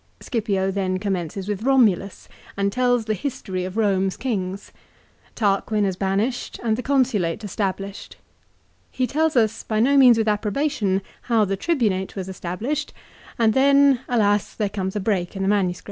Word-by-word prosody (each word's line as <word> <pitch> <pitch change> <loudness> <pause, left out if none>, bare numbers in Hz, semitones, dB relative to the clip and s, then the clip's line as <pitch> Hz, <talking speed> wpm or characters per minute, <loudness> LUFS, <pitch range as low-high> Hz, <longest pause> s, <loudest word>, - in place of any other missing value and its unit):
Scipio 200 -5 -1
then 185 -1 -1
commences 190 -1 -3
with 205 -1 -3
Romulus, 225 -7 +2 0.3
and 200 0 +1
tells 245 -2 +1
the 215 - 0
history 190 -7 -4
of 185 +1 -7
Home's 195 -3 +1
kings. 195 -6 -3 0.6
Tarquin 210 0 +1
is 190 -2 -1
banished 200 +6 -2
and 220 -2 +1
the 245 - -4
Consulate 235 -9 0
established. 195 0 -4 0.7
He 255 - -1
tells 310 +3 0
us, 225 -2 +2
by 215 -1 -2
no 275 +5 +4
means 250 -4 +7
with 220 -1 0
approbation, 210 -2 0 0.3
how 225 -3 +4
the 195 0 -1
Tribunate 205 - -1
was 190 -2 -5
established, 210 - -4 0.4
and 225 -2 +3
then, 275 0 +5
alas, 205 -4 +1
there 210 -2 -1
comes 190 -1 -4
a - - 0
break 190 -3 -1
in 195 0 -1
the 205 - +4
MS. 185 -3 0
210 Hz, 160 wpm, -22 LUFS, 190-245 Hz, 0.7 s, means